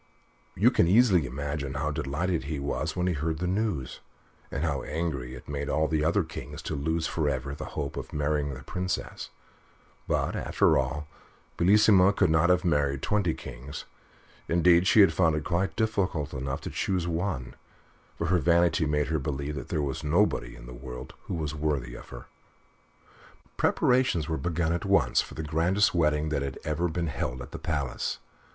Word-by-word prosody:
You - - +5
can - - +3
easily 95 - +5
imagine 70 +1 -4
how 75 +1 -1
delighted 80 +5 -1
he 75 +1 -3
was 70 0 -2
when 90 -1 0
he 90 - +1
heard 80 +1 -2
the 90 - -2
news, 95 - -1 0.5
and 70 - -3
how 70 -5 0
angry 70 -6 -3
it 65 - -12
made 70 0 -3
all 80 +1 +2
the 75 -1 0
other 85 +5 +2
kings 85 +1 -8
to - - -3
lose 80 +3 -1
for 80 -2 0
ever 70 0 -3
the 70 - -6
hope 70 -2 -3
of - - -6
marrying 75 -1 -1
the 65 - -10
Princess; 90 +4 -4 0.8
but, - - 0
after - - +2
all, 75 0 -1 0.5
Bellissima 100 +1 +5
could 90 -5 +3
not 80 +2 +4
have 90 0 +3
married 70 -4 +1
twenty 100 -6 +1
kings 65 +3 -8 0.6
indeed, 85 +1 +4
she 110 - +7
had 100 - +6
found 80 -4 +3
it 75 - -2
quite 95 +3 -1
difficult 95 -9 0
enough 65 0 -3
to - - -6
choose 90 -3 -1
one, 85 -7 -2 0.6
for 85 - -2
her 90 +2 +3
vanity 85 -1 +3
made 75 0 0
her 80 -1 +1
believe 70 +1 -3
that 75 - -6
there 75 - 0
was 70 -2 -3
nobody 75 -5 +1
in - - -12
the 60 - -9
world 60 0 -8
who - - -3
was 80 -2 -3
worthy 75 -6 -2
of - - -11
her. - - -9 1.3
Preparations 125 - +2
were 80 -1 -1
begun 85 +2 0
at 85 - -2
once - - +3
for - - -9
the 80 - -4
grandest 85 +6 +2
wedding 75 -2 +2
that 75 -2 -1
had 70 -1 -4
ever 75 +3 0
been 85 +1 -2
held 65 -4 -3
at - - -12
the - - -6
palace. - - -2
80 Hz, 185 wpm, -28 LUFS, 70-85 Hz, 1.3 s, she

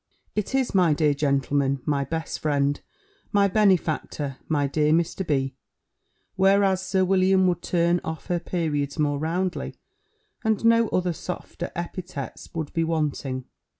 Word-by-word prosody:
It 210 +5 -2
is, 265 -2 +1
'My 175 -6 +4
dear 150 -1 +3
gentleman, 140 -1 +1
my 140 -2 +1
best 160 +4 -4
friend, 145 -1 +1 0.5
my 200 -1 +4
benefactor, 170 -8 +1
my 145 -3 +1
dear 150 +2 +1
Mr. 170 +3 +1
B.' 135 -2 0 0.8
whereas 195 0 +4
Sir 190 0 +1
William 190 0 +4
would 175 -2 +1
turn 170 0 +1
off 160 0 -5
her 175 -1 0
periods 150 -5 -2
more 145 -2 +1
roundly, 175 +4 -2 0.7
and 220 0 +1
no 230 0 +5
other 180 -3 0
softer 175 +1 -6
epithets 170 -4 -6
would 160 -3 -4
be 165 - +1
wanting." 145 -5 -2
165 Hz, 140 wpm, -25 LUFS, 145-185 Hz, 0.8 s, no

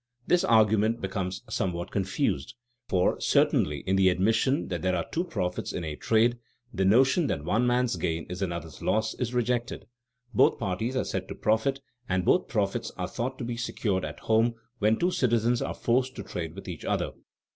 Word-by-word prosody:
This 180 +1 +3
argument 110 - +3
becomes 95 +1 -3
somewhat 90 -4 -2
confused, 105 +5 -1 0.3
for 90 -1 +1
certainly 75 -2 +2
in 95 0 0
the 95 -1 +5
admission 110 +9 +1
that 90 -3 -3
there 95 0 +1
are 85 - -1
"two 170 - 0
profits" 90 - -3
in 90 - -4
a 80 -2 -4
trade, 115 +7 +2 0.3
the 95 - 0
notion 130 - +4
that 70 - -2
"one 115 +7 +2
man's 125 0 +1
gain 80 -2 -2
is 90 +2 -6
another's 85 -4 -4
loss" 110 +1 +1
is 125 0 -3
rejected. 120 -4 -1 0.5
Both - - +4
parties 105 +7 -2
are 130 - +1
said 95 0 -3
to - - -6
profit 115 +6 +1 0.3
and 95 -1 0
both 180 - +3
profits 110 +1 -1
are 90 -1 -2
thought 125 +6 -4
to - - -5
be 120 0 -4
secured 105 -5 -1
at 75 -1 -6
home 115 +1 +2 0.2
when 110 +1 +3
two 180 +1 +1
citizens 120 -4 +2
are - - -3
forced 130 +2 0
to - - -6
trade 80 -1 -5
with 100 - -9
each 85 -4 -6
other. - - -1
110 Hz, 190 wpm, -27 LUFS, 90-120 Hz, 0.5 s, the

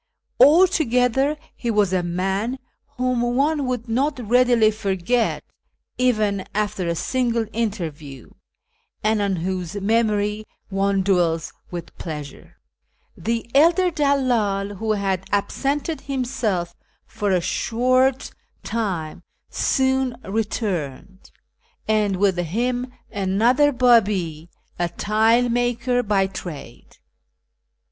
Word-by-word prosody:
Altogether 285 -4 +4 0.2
he 240 - -4
M 220 - -1
as 200 -3 +3
a 185 - +2
man 190 +8 -2 0.4
whom 250 -1 0
one 275 +4 +1
would 250 -2 -3
not 265 +5 0
readily 240 -2 +4
forget, 210 +2 -1 0.6
even 215 -6 +1
after 210 -3 -1
a 170 - 0
single 235 +3 0
interview, 160 - -4 0.7
and 215 0 +2
on 200 -2 0
M'hose 185 +2 -3
memory 210 0 0 0.2
one 195 0 +1
dM'ells 170 -4 +1 0.2
with 175 -2 -7
pleasure. 150 -4 -8 0.6
The 230 0 -3
elder 340 +6 +4
dallcd, 245 -10 +1
M'ho 220 +3 -2
had 195 -2 -1
absented 280 +9 -1
himself 230 -10 -2 0.3
for 210 -2 -3
a 185 -2 +3
short 255 +7 +1
ISFAHAN - - -8
:ii - - -36
time, 180 -7 -3 0.3
soon 265 -2 +1
returned, 190 - -4 0.6
and 210 -2 +2
with 190 -1 +2
him 245 +8 -1 0.2
another 225 +9 +2
Babi, 205 - +2 0.3
a 175 0 0
tile 220 +6 +2
maker 245 +1 +1
by 200 -4 +1
trade. 170 -10 -9
215 Hz, 105 wpm, -22 LUFS, 190-250 Hz, 0.7 s, Altogether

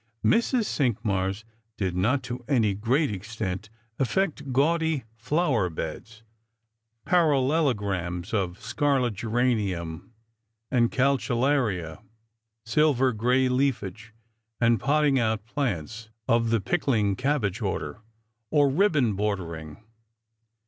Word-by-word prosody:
Mrs. 235 +1 +3
Cinqmars 105 - -1 0.3
did 95 -3 -1
not 115 +10 +1
to 125 0 -6
any 115 -7 +2
great 125 +8 +1
extent 105 0 -5 0.3
alFect 150 -1 -1
gaudy 160 +1 +1
flower 125 - +1
beds 100 +8 -7 0.4
— 115 0 -51
parallelograms 130 - +1
of 95 -3 -1
scarlet 125 +1 0
geranium 105 -7 -1 0.6
and 120 -3 +3
calceolaria, 125 - +1 0.6
silver 130 0 +3
gray 125 +4 +2
leafage, 115 -5 -1 0.5
and 115 -1 +3
potting 145 -2 +2
out 110 -2 0
plants 110 - -3 0.2
of 115 0 +2
the 115 0 +2
pickling 105 - +1
cabbage 130 -7 -1
order 115 - -3 0.3
— 110 0 -51
or 145 +1 +4
ribbon 145 - +2
bordering. 90 -5 -4
115 Hz, 100 wpm, -26 LUFS, 100-140 Hz, 0.6 s, or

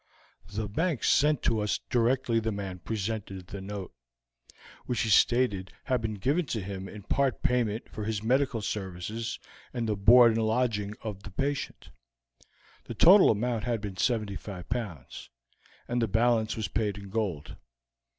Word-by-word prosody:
The 105 +1 -3
Bank 155 - -1
sent 150 -2 +3
to 115 - +2
us 105 0 0
directly 120 -1 +2
the 110 0 -2
man 100 -3 -5
presented 100 -2 -4
the 95 +2 -8
note, 100 -1 -6 0.9
which 120 -3 0
he 115 - 0
stated 105 -3 +3
had 130 -3 0
been 110 -2 -3
given 140 - 0
to 110 - -2
him 95 0 -6
in 105 -2 -10
part 135 +3 0
payment 120 -3 0
for 105 - -6
his 110 -1 -2
medical 125 -1 +1
services 105 +3 -4 0.3
and 120 -3 -2
the 105 - 0
board 115 +4 +7
and 115 0 0
lodging 110 -3 0
of 105 -3 -5
the 100 - -9
patient; 140 +9 -3 0.9
the 120 - -7
total 185 - +7
amount 115 +1 0
had 120 -2 0
been 100 -3 -6
75 100 -5 -2
pounds, 105 - -5 0.6
and 120 0 0
the 115 - +2
balance 115 +1 +2
was 110 - -2
paid 105 -3 -1
in 100 -1 -9
gold. 95 -9 -3
110 Hz, 160 wpm, -28 LUFS, 100-120 Hz, 0.9 s, board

